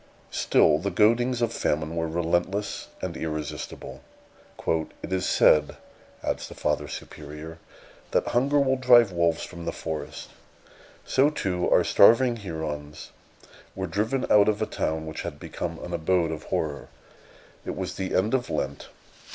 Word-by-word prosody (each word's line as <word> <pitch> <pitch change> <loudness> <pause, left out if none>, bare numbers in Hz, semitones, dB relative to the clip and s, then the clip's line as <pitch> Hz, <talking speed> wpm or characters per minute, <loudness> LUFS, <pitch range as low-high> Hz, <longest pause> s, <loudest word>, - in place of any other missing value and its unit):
Still 75 -1 +3
the 100 +4 -2
goadings 120 +4 +3
of 115 0 0
famine 80 +2 -1
were 80 0 -1
relentless 85 +5 -1 0.2
and 90 -2 -3
irresistible. 80 -2 -5 0.7
"It 80 +3 -2
is 95 0 0
said," 75 - +4 0.5
adds - - -2
the - - -11
Father 75 -1 -1
Superior, 75 +4 -9 0.5
"that - - +1
hunger 140 +4 +2
will 135 -1 +2
drive 120 -4 +6
wolves 85 -1 +1
from 85 -1 -8
the - - -1
forest. 80 -2 -6 0.8
So, 135 +3 +3
too, 90 -11 -1
our - - +5
starving 120 +3 +5
Hurons 80 -6 -6 0.6
were 95 - -3
driven 110 +9 -1
out 105 0 +6
of 105 - 0
a - - +1
town 80 0 -2
which 80 -1 -5
had - - -6
become 85 -2 -5
an 90 - -7
abode 85 0 +1
of 80 - -6
horror. 75 -2 -2 0.8
It - - -4
was - - -4
the 95 -1 -3
end 105 +6 +2
of 125 -2 0
Lent. 70 +1 -3
90 Hz, 150 wpm, -26 LUFS, 80-110 Hz, 0.8 s, drive